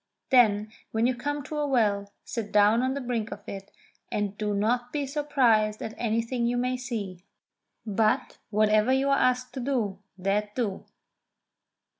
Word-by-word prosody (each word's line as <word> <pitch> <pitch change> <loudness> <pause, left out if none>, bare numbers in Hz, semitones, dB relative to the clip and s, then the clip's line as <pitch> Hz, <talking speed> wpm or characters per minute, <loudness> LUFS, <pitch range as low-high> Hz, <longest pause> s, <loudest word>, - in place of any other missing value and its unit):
Then, 215 -4 +4 0.2
when 225 +1 +1
you 255 - +3
come 290 +4 -3
to 300 +2 -6
a 295 - 0
well, 205 -6 +1
sit 225 -4 -4
down 210 +3 +5
on 260 +1 0
the 280 - -3
brink 235 -3 -2
of 205 - -7
it, 195 0 -7 0.7
do 210 -1 -2
not 240 +4 0
be 290 0 -1
surprised 250 -7 +2
at 220 - -5
anything 235 +1 0
you 245 +1 0
may 250 +1 0
see, 215 -8 -5 0.6
but, 215 0 0
whatever 215 +2 +3
you 265 +1 +2
are 275 - +4
asked 255 0 +1
to 265 - -5
do, 240 -7 -1 0.2
that 205 +2 -1
do!" 215 -6 -2
230 Hz, 160 wpm, -27 LUFS, 210-255 Hz, 0.7 s, down